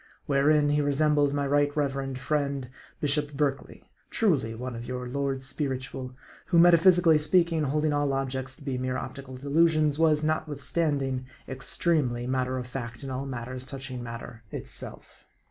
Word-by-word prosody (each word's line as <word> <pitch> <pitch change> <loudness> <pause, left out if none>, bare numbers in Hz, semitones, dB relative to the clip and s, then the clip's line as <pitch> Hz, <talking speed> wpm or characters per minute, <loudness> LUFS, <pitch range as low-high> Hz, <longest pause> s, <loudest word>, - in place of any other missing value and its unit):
Wherein, 145 +1 +3
he 150 0 +2
resembled 145 0 +2
my 145 0 0
Right 145 +1 +1
Reverend 135 -2 -1
friend, 140 -1 -2 0.3
Bishop 145 0 0
Berkeley 140 -1 -2 0.2
truly, 140 - +1
one 125 +1 -5
of 115 +1 -7
your 125 0 -4
lords 135 0 -2
spiritual 130 -2 -4 0.3
who, 175 - +2
metaphysically 170 -1 +6
speaking, 165 +1 +3
holding 150 +2 +1
all 145 -1 +1
objects 130 -1 -3
to - - -16
be 135 -3 -2
mere 130 0 -1
optical 130 -1 -7
delusions, 155 +1 +2
was, 155 -2 +3
notwithstand 155 -1 0
ing, 130 -1 -3 0.2
extremely 130 -2 0
matter 130 0 -1
of 125 - -4
fact 120 -1 -6
in 135 - -5
all 130 +2 -3
matters 125 0 -5
touching 130 -1 -6
matter 115 -1 -8
itself. - - -5
140 Hz, 150 wpm, -27 LUFS, 130-150 Hz, 0.3 s, metaphysically